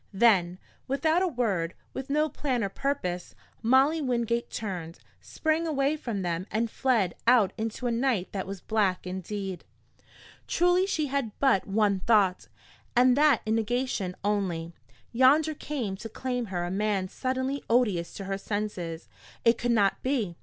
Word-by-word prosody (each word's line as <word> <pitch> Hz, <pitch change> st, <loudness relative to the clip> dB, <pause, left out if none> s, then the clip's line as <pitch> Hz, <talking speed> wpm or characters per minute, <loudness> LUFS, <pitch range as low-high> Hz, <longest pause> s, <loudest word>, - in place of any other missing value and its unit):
Then, 190 Hz, -5 st, +3 dB, 0.3 s
without 315 Hz, +6 st, +2 dB
a 375 Hz, -, +2 dB
word, 205 Hz, -, -1 dB, 0.2 s
with 265 Hz, 0 st, -6 dB
no 300 Hz, +2 st, +2 dB
plan 260 Hz, -6 st, -2 dB
or 200 Hz, -, -1 dB
purpose, 190 Hz, -9 st, -3 dB, 0.3 s
Molly 270 Hz, +7 st, +4 dB
Wingate 235 Hz, -3 st, -1 dB
turned, 180 Hz, -6 st, -5 dB, 0.2 s
sprang 315 Hz, +1 st, -1 dB
away 285 Hz, -1 st, +1 dB
from 230 Hz, -10 st, -4 dB
them 175 Hz, +2 st, -2 dB
and 225 Hz, +1 st, -1 dB
fled 230 Hz, -9 st, +1 dB
out 235 Hz, -5 st, +5 dB
into 225 Hz, +2 st, -4 dB
a 240 Hz, -, +1 dB
night 230 Hz, -5 st, 0 dB
that 190 Hz, -2 st, -4 dB
was 195 Hz, -1 st, -6 dB
black 200 Hz, -5 st, 0 dB
indeed. 190 Hz, +1 st, -5 dB, 0.8 s
Truly 355 Hz, +2 st, +3 dB
she 315 Hz, -6 st, 0 dB
had 270 Hz, -6 st, -2 dB
but 265 Hz, -9 st, +2 dB
one 200 Hz, -1 st, +2 dB
thought, 195 Hz, -3 st, +2 dB, 0.5 s
and 250 Hz, +1 st, +5 dB
that 295 Hz, 0 st, +4 dB
in 220 Hz, -, 0 dB
negation 225 Hz, -4 st, -1 dB
only. 185 Hz, -5 st, -1 dB, 0.4 s
Yonder 285 Hz, +6 st, +4 dB
came 260 Hz, -10 st, -4 dB
to 225 Hz, +3 st, -7 dB
claim 245 Hz, 0 st, -3 dB
her 175 Hz, -2 st, -2 dB
a 175 Hz, -, -4 dB
man 200 Hz, -1 st, 0 dB
suddenly 260 Hz, +5 st, -2 dB
odious 210 Hz, -8 st, +2 dB
to 195 Hz, -, -6 dB
her 195 Hz, 0 st, -3 dB
senses. 190 Hz, -6 st, -4 dB, 0.4 s
It 230 Hz, 0 st, +4 dB
could 240 Hz, -, -1 dB
not 205 Hz, -4 st, +2 dB
be. 240 Hz, -10 st, -1 dB
225 Hz, 155 wpm, -28 LUFS, 195-265 Hz, 0.8 s, out